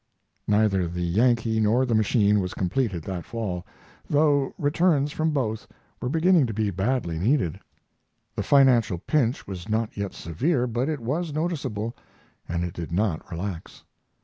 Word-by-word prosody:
Neither 105 -4 +2
the 90 +1 -3
Yankee 115 +4 +2
nor 110 +4 +3
the 120 - -1
machine 105 -1 +3
was 90 -1 -3
completed 95 -2 -1
that 90 -2 -4
fall, 100 -7 -4 0.4
though 145 -2 +3
returns 150 -1 +2
from 160 +2 0
both 120 -8 -2 0.3
were 125 - -2
beginning 165 -1 +4
to 110 - -5
be 105 -2 0
badly 95 -3 -1
needed. 95 - +1 0.8
The - - -1
financial 125 -9 +4
pinch 125 - 0
was 95 +1 -7
not 110 0 -1
yet 100 -1 -4
severe, 125 - 0
but 120 +4 -1
it 150 -5 -3
was 150 +6 -2
noticeable, 140 -10 -2 0.5
and 85 +1 -1
it 90 -1 -4
did 85 -2 -6
not 90 -2 -1
relax. 90 0 -6
110 Hz, 150 wpm, -25 LUFS, 95-135 Hz, 0.8 s, beginning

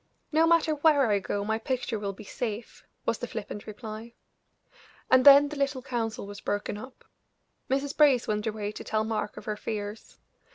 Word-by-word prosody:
"No 320 +1 +4
matter 330 -2 +4
where 295 -2 +4
I 200 - +3
go 200 +1 -3
my 220 +1 0
picture 245 -2 -2
will 200 -1 -2
be 195 +2 -11
safe," 220 +1 -5 0.2
was - - 0
the - - -4
flippant 210 - -6
reply. 220 +2 -8 1.0
And 255 0 +6
then 285 +1 +9
the 300 - -6
little 275 -2 -1
council 230 -2 -3
was 205 0 -9
broken 205 0 -2
up. 255 +5 -11 0.6
Mrs. 275 +2 0
Brace 280 -5 +5
went 210 0 -1
away 210 -1 -3
to - - -8
tell 215 0 0
Mark 220 -1 -3
of - - -9
her 215 - -2
fears. 210 0 -6
225 Hz, 180 wpm, -28 LUFS, 210-275 Hz, 1.0 s, then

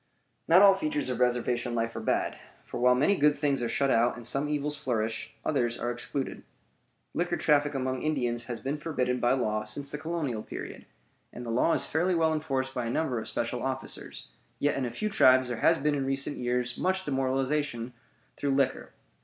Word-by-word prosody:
Not 180 +4 +7
all 200 -1 +9
features 305 +8 -2
of - - -3
reservation 120 0 +1
life 115 0 -1
are - - -3
bad; - - 0 0.3
for - - -6
while 125 +1 +5
many 150 +11 +3
good 150 -3 +4
things 140 -3 0
are 120 - -1
shut 140 +2 +1
out 120 +2 +3
and 120 -1 -9
some 140 +5 0
evils 150 0 0
flourish, 115 -5 -2
others 120 -6 +1
are 120 - -1
excluded. 130 +3 -4 0.7
Liquor - - 0
traffic 145 -1 +2
among 130 -1 -1
Indians 120 -6 -1
has 120 -2 -5
been 140 +3 -3
forbidden 125 -6 -1
by 120 - +3
law 110 -5 0
since 140 +7 -7
the 150 - -5
colonial 155 -9 -2
period; - - -8 0.4
and 120 - -8
the 115 - -3
law 125 +8 +3
is - - +1
fairly 175 +3 +1
well 160 -1 +3
enforced 135 -4 -2
by 125 -3 -2
a - - -2
number 125 -2 0
of 110 - -7
special 120 +1 -2
officers; 130 0 -5 0.3
yet 145 - +1
in 135 - -1
a - - -2
few 215 - -2
tribes 130 -11 +5
there 120 - -3
has 165 +7 +4
been 150 +1 +1
in 135 -2 -1
recent 135 +1 -1
years 125 0 -1
much 190 +1 0
demoralization 135 -3 -1 0.4
through 140 -1 0
liquor. 135 -1 0
135 Hz, 200 wpm, -28 LUFS, 120-150 Hz, 0.7 s, all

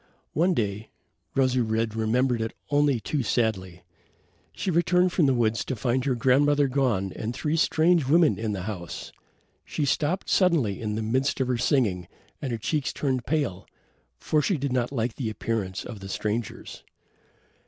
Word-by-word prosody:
One 175 +3 +2
day 105 0 -2 0.5
Rosy 130 -2 +2
red 110 -1 0
remembered 120 +2 +1
it 110 - -3 0.2
only 145 -3 +3
too 145 +5 -2
sadly 95 -7 -1 0.7
she 195 - -3
returned 180 +2 +3
from 160 -6 +3
the 135 - +3
woods 115 -2 +1
to 130 - -3
find 125 +2 0
her 130 -3 +1
grandmother 140 +3 +3
gone 125 -8 0
and 115 +2 -4
three 150 +3 -1
strange 165 -1 +3
women 160 +2 +4
in 110 -1 -2
the 95 -3 -4
house. 90 -5 -6 0.5
She 150 - -2
stopped 155 +6 0
suddenly 155 - +2
in 105 -2 -2
the 110 - -2
midst 130 +6 0
of 130 -1 0
her 125 - +1
singing 100 - +1 0.3
and 135 - -3
her 115 - -1
cheeks 145 +5 -1
turned 130 -4 -2
pale, 135 - -1 0.5
for 155 - +1
she 180 +4 +1
did 140 -2 -2
not 125 0 0
like 120 -3 -2
the 120 -5 -2
appearance 105 -3 -3
of 115 -4 -8
the 95 0 -8
strangers. 105 +2 -4
125 Hz, 170 wpm, -26 LUFS, 110-145 Hz, 0.7 s, women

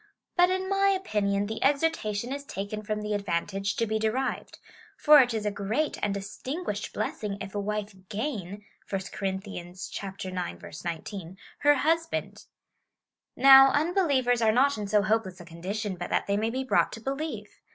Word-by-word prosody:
But, 355 0 +5
in 375 0 -1
my 395 0 +2
opinion, 210 - +1
the 220 +2 -4
exhortation 270 -6 +1
is 280 0 -5
taken 205 -4 -5
from 210 0 -3
the 210 0 -2
advantage 195 0 -1
to 230 - +1
be 220 0 -1
derived; 220 +5 -2 0.4
for 300 -1 +8
it 245 -1 +1
is 220 -2 -2
a 210 - +1
great 215 +10 -1
and 205 - +1
distinguished 210 - -4
blessing 205 -2 -3
if 195 - -7
a 205 - -2
wife 210 0 -3 0.2
gain 205 - -4 0.2
(1 195 -1 -1
Cor. 195 - -2
ix. 185 - -6
19) 175 +2 -6 0.2
her 290 0 +5
husband. 325 +4 -1 0.9
Now, 270 0 +9
unbelievers 290 -7 +2
are 220 -1 +4
not 275 +5 +3
in 210 -1 -4
so 210 0 +3
hopeless 210 -3 0
a 175 - -10
condition 190 +4 -4
but 175 - -5
that - - +1
they 200 - 0
may 220 +2 0
be 260 +3 -2
brought 260 - +2
to - - -6
believe. 275 +6 -5
215 Hz, 165 wpm, -28 LUFS, 200-270 Hz, 0.9 s, Now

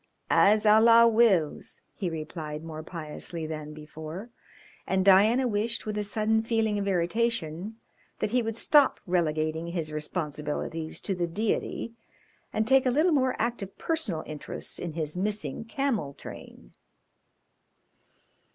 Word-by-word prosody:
"As 210 +1 +5
Allah 230 +2 +7
wills!" 220 -9 +2
he 185 - -3
replied 155 -1 -6
more 160 -1 -7
piously 160 0 -5
than 155 -1 -6
before, 155 +7 -8 0.6
and 190 0 +1
Diana 215 +7 +5
wished, 225 +1 -1
with 215 -1 -3
a 210 - -1
sudden 215 +2 +1
feeling 225 -2 0
of 200 - -2
irritation, 190 0 -1 0.4
that 210 - -2
he 250 +1 +3
would 225 -1 -3
stop 290 +3 +4
relegating 160 -2 0
his 165 -3 -3
responsibilities 150 0 -4
to 200 - -2
the 175 -2 -1
Deity 215 +4 -2 0.6
and 220 - 0
take 265 +2 +4
a - - +3
little 310 +7 +3
more 260 -3 +2
active 225 -4 -3
personal 280 - -1
interest 150 -1 -6
in 170 -3 -5
his 155 -1 -2
missing 210 +3 -2
camel 230 - -1
train. - - -11
195 Hz, 135 wpm, -27 LUFS, 160-225 Hz, 0.6 s, Allah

